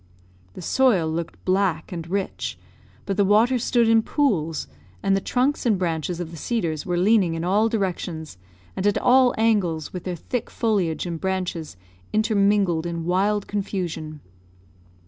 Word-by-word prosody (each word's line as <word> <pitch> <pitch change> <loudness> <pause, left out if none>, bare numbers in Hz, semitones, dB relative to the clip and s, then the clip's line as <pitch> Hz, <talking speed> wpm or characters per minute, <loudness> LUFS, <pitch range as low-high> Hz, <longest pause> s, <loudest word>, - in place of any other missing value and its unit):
The - - -8
soil 220 -7 +3
looked 165 +1 -5
black 185 -4 +1
and 170 -2 -6
rich, 195 +1 -3 0.5
but 195 - -2
the 205 - +4
water 220 +6 +4
stood 235 -1 +2
in 225 0 +5
pools, 175 - 0 0.4
and 195 - +3
the 195 - 0
trunks 260 +8 0
and 225 -6 +2
branches 170 -1 -2
of 170 -2 -5
the 165 - -9
cedars 165 -5 -2
were 175 -1 0
leaning 185 -2 +3
in 165 - -3
all 205 +5 +2
directions, 175 - -3 0.4
and 195 - 0
at 205 - +2
all 255 0 +4
angles, 195 -9 +1
with 180 -2 -5
their 180 -1 -2
thick 235 +8 -4
foliage 195 -9 0
and 170 -2 -5
branches 180 - -3 0.4
intermingled 200 -5 +2
in 170 -1 -4
wild 200 +3 +1
confusion. 175 -7 -4
190 Hz, 155 wpm, -23 LUFS, 165-215 Hz, 0.5 s, in